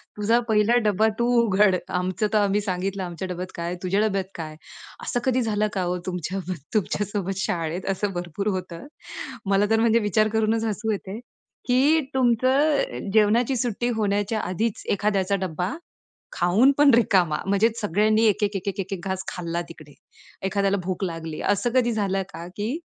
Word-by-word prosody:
"तुझा 220 +3 +2
पहिला 215 +2 +3
डब्बा 210 +1 +3
तू 235 - +2 0.2
उघड, 205 -3 +3
आमचं 185 +3 -1
तर 215 - +4
आम्ही 205 0 +2
सांगितलं 195 0 -2
आमच्या 175 +1 -5
डब्यात 180 0 -5
काय, 170 +1 -3
तुझ्या 190 +2 +1
डब्यात 195 -3 +1
काय?" 155 -2 -6 0.5
असं 245 - -1
कधी 255 -1 +2
झालं 215 -2 0
का 185 -2 -1
ओ? 180 +1 -1
तुमच्या 180 +1 -3
बर 185 - -2 0.2
तुमच्या 210 0 0
सोबत 195 -2 -3
शाळेत 170 -1 -2
असं 195 +1 -1
भरपूर 175 +3 -4
होतं. 185 +6 -7 0.6
मला 200 +1 +3
तर 225 0 +3
म्हणजे 230 0 +4
विचार 215 0 +2
करूनच 220 0 +1
हसू 220 +1 -1
येते, 200 0 -4 0.5
की 285 +6 +4
तुमचं, 260 - +2
जेवणाची 225 +4 +3
सुट्टी 240 0 -1
होण्याच्या 205 +1 0
आधीच 210 +4 -2
एखाद्याचा 200 -1 +1
डब्बा 180 +3 -3 0.6
खाऊन 200 +10 +4
पण 290 -1 +7
रिकामा 185 -9 +3
म्हणजे 200 +3 +3
सगळ्यांनी 215 +2 +2
एक, 210 0 +2
एक, 205 -1 -1
एक, 195 +1 -4
एक, 195 +1 -2
एक, 195 +1 -6
एक 185 -2 -4
घास 190 0 -3
खाल्ला 170 -1 -3
तिकडे, 155 -3 -13 0.5
एखाद्याला 200 0 +1
भूक 185 +1 -2
लागली 165 -3 -5
असं 240 +4 -1
कधी 245 -2 +3
झालं 195 -3 0
का, 170 +1 -7
की 225 +9 -2
200 Hz, 170 wpm, -24 LUFS, 185-220 Hz, 0.6 s, पण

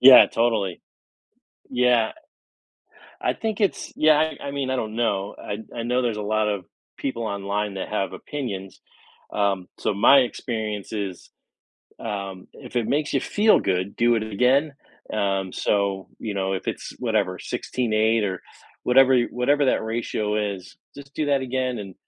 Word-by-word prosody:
Yeah, 130 0 +10
totally. 110 -6 0 0.9
Yeah, 125 -2 +3 0.9
a - - -7
I - - -2
think 220 -2 -3
it's 200 -3 0
Yeah, 155 -1 +5
I 155 -2 -1
I - - -2
mean, 140 -2 -2
I 130 - +1
don't 110 -3 -3
know. 100 -4 0
I 100 - -4
d 110 - -8
I 115 - -2
know 125 +2 +1
there's 120 -3 0
a 105 - -3
lot 110 0 +2
of 100 -3 -2 0.3
people 125 -4 -3
online 100 0 -2
that 95 - -4
have 100 -3 -1
opinions. 100 -10 -6 0.5
Um, 100 -3 0
so - - 0
my 115 +7 +7
experience 110 -5 -3
is, 100 -5 -5 0.7
um, 100 -4 -5
if 125 -2 -10
it 120 -2 +1
makes 145 +1 0
you 135 - +3
feel 210 - +4
good, 95 +1 -1
do 120 0 +4
it 110 - 0
again, 125 +8 +2 0.4
um, 95 -3 0
so, 100 -2 0
you 110 -3 -4
know, 95 -1 -1
if 95 - -3
it's - - -4
whatever, 105 -6 0
16:8 110 -2 0
or 95 -3 -3 0.4
whatever 130 +1 +6
you 120 -1 +3
whatever 140 +4 +2
that - - +2
ratio 110 -2 -1 0.2
is, 90 0 -12 0.2
just 140 0 -12
do 155 - -1
that 140 -1 +2
again 130 -1 -1
and, 100 -3 -7
110 Hz, 170 wpm, -24 LUFS, 100-130 Hz, 0.9 s, Yeah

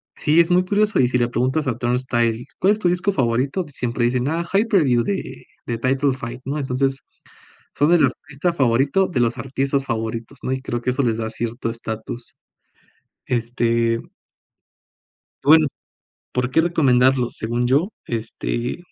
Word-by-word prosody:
sí, 155 +3 +3
es 170 +1 +4
muy 180 +1 +4
curioso 210 0 +2
y 125 - +5
si 125 0 +1
le 120 - +2
preguntas 130 +5 0
a 120 -2 -1
Turnstile: 120 -1 0
"¿Cuál 200 +3 +4
es 215 - -5
tu 180 - +2
disco 180 +3 +1
favorito?", 130 +5 0
siempre 120 -2 -1
dicen: 125 +2 0
"Ah, 165 +2 -1
Hyperview 190 - +3
de 100 - -4 0.2
de 120 -1 -2
Title 135 +3 +1
Fight", 120 0 -7
¿no? 140 +2 -2
Entonces, 135 -1 -1 0.7
son 150 +4 +3
el 160 -5 +5
artista 150 +6 -3
favorito 135 +6 +2
de 140 - -2
los 120 0 +1
artistas 135 +2 -1
favoritos, 115 +3 -4
¿no?, 130 - -2
y 130 0 -2
creo 120 -2 -3
que 125 - 0
eso 135 +2 0
les 115 -2 0
da 110 0 -2
cierto 115 +1 -3
estatus. 115 +1 -7 0.9
Este 115 -1 +1 1.5
Bueno, 155 +2 +7 0.7
¿por 125 0 0
qué 160 - +4
recomendarlos? 130 -6 +3
Según 120 +2 -1
yo, 145 - +2 0.2
este 120 +2 -3
130 Hz, 160 wpm, -21 LUFS, 120-150 Hz, 1.5 s, Bueno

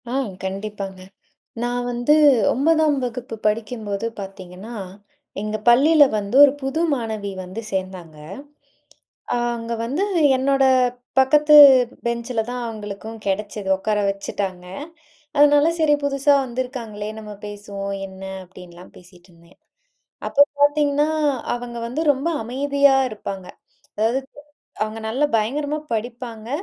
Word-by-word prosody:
ஆ - - -4 0.3
கண்டிப்பாங்க. 195 0 -5 0.6
"நான் 245 0 -1
வந்து 245 +4 +2 0.4
9ம் 310 +2 +2
வகுப்பு 245 -1 -5
படிக்கும்போது 215 -1 -3
பாத்தீங்கன்னா 195 +3 -9 0.7
எங்க 215 +1 -3
பள்ளியில 290 +6 +6
வந்து 205 +3 -3
ஒரு 285 - +7
புது 270 +4 -2
மாணவி 220 -5 -3
வந்து 185 +5 -7
சேந்தாங்க. 185 -4 -5 1.2
அ - - +1 0.2
அங்கே 230 0 -4
வந்து, 285 +12 -1 0.3
என்னோட 270 +1 +2 0.5
பக்கத்து 295 +3 +5 0.5
பெஞ்ச்சில 235 0 -1
தான் 250 0 -4
அவங்களுக்கும் 215 0 -7
கிடைச்சது, 205 0 -3
உக்கார 210 +2 -1
வச்சுட்டாங்க. 195 -2 -5 0.7
அதனால 290 +1 +6
சரி 310 -2 +3
புதுசா 280 +1 +3
வந்திருக்காங்களே, 240 -4 -5
நம்ம 210 -1 -9
பேசுவோம், 200 -1 -6
என்ன 190 0 -13 0.2
அப்டின்லாம் 180 -1 -14
பேசிகிட்டுருந்தேன்." 175 -1 -19 0.7
அப்போ 285 - +5 0.2
பாத்தீங்கன்னா, 290 0 +3 0.5
அவங்க 240 -1 -7
வந்து 255 +6 -3
ரொம்ப 280 +4 -3 0.2
அமைதியா 280 +3 +2
இருப்பாங்க. 195 -3 -7 0.5
அதாவது 225 +5 +1 0.6
அவுங்க 215 +1 -4
நல்லா 265 +7 +1
பயங்கரமா 285 +7 -1 0.2
படிப்பாங்க. 230 0 -6
230 Hz, 110 wpm, -21 LUFS, 200-270 Hz, 1.2 s, ஒரு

